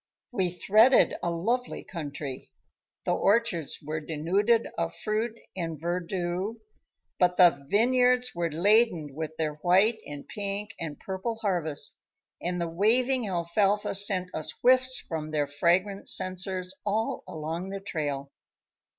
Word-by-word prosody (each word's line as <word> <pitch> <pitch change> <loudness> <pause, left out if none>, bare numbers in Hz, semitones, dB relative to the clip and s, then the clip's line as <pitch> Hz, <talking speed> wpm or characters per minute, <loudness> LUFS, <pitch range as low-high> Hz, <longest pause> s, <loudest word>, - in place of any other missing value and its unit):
We 190 -7 0
threaded 215 +8 +5
a 175 - 0
lovely 230 +10 -1
country. 145 - -6 0.6
The - - +2
orchards 200 -8 +1
were 155 +2 -3
denuded 185 +10 +1
of 170 0 -2
fruit 220 +2 -2 0.2
and 165 -4 -4
verdure, 175 +4 -2 0.6
but 180 0 +3
the 165 -7 +5
vineyards 250 +2 +3
were 170 -1 -1
laden 175 - +2
with 160 +1 -5
their 155 -2 -2
white 190 +7 +3
and 145 -1 -8
pink 200 0 -4
and 155 -3 -5
purple 190 +4 -4
harvest, 175 -9 0 0.4
and 180 +1 -2
the 170 - -1
waving 235 +8 +2
alfalfa 195 +4 +1
sent 190 -2 +1
us 155 - -4
whiffs 255 +1 +4
from 155 -6 -5
their 150 -1 0
fragrant 175 +7 +1
censers 185 0 -1
all 215 +2 -1
along 160 +4 -4
the 195 0 -4
trail. 145 -7 -4
180 Hz, 130 wpm, -28 LUFS, 160-210 Hz, 0.6 s, threaded